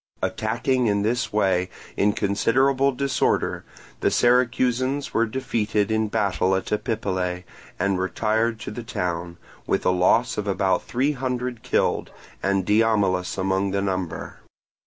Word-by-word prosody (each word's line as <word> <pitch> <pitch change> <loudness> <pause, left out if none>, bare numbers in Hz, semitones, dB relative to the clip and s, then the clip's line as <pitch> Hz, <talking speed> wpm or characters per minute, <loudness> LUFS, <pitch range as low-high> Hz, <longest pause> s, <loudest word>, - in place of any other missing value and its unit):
Attacking 130 -2 0
in 100 -1 +1
this 120 +5 0
way 95 -3 +1 0.3
in 105 +1 +2
considerable 130 +7 +2
disorder, 135 0 0 0.4
the - - +2
Syracusans 125 +2 +2
were 115 0 +2
defeated 110 -4 -1
in 110 0 +1
battle 95 -2 +1
at 95 - -3
Epipolae 95 -5 -2 0.3
and 95 0 0
retired 110 +4 0
to - - -5
the 120 - -6
town, 90 -7 -3 0.3
with - - 0
a - - +4
loss 105 +6 +2
of 105 - -3
about 95 -1 +1
three 130 +5 0
hundred 125 -3 -3
killed, - - 0 0.3
and 95 -1 +1
Diomilus 105 -4 +2
among 95 +1 0
the 100 +1 -1
number. 95 -3 -3
105 Hz, 135 wpm, -24 LUFS, 95-125 Hz, 0.4 s, a